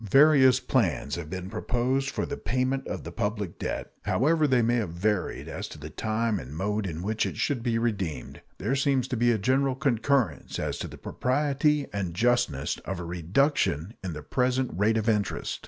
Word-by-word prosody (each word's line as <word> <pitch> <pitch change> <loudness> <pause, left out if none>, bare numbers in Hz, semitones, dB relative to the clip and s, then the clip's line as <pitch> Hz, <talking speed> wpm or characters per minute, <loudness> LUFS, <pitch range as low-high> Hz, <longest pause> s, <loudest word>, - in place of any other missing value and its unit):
Various 135 -1 +6
plans 95 - 0
have 85 -3 -4
been 95 0 -5
proposed 125 +6 0
for - - -2
the 145 - -4
payment 130 0 -1
of - - -4
the - - -7
public 105 -4 -3
debt. - - -3
However 155 +4 +3
they 125 -3 +3
may 120 +2 +2
have 110 -7 -1
varied 95 +3 -1
as - - -5
to - - -10
the 75 +1 -8
time 110 +3 -1
and 70 +1 -8
mode 105 +2 -1
in 85 0 -5
which 110 +2 0
it - - -6
should 140 -5 0
be 115 -1 0
redeemed, 100 - -2 0.2
there 115 +8 0
seems 135 -2 +1
to - - -1
be 120 +1 +3
a 115 - +2
general 130 +5 +2
concurrence 130 - 0
as - - -2
to - - -3
the - - -10
propriety 145 +2 +1
and 95 -4 -3
justness 110 - +1
of 95 -2 -5
a 85 - -5
reduction 90 - +1
in 90 -3 -3
the 75 -1 -7
present 130 - 0
rate 105 +5 +2
of 110 0 -1
interest. 105 -3 0
115 Hz, 195 wpm, -27 LUFS, 95-130 Hz, 0.2 s, Various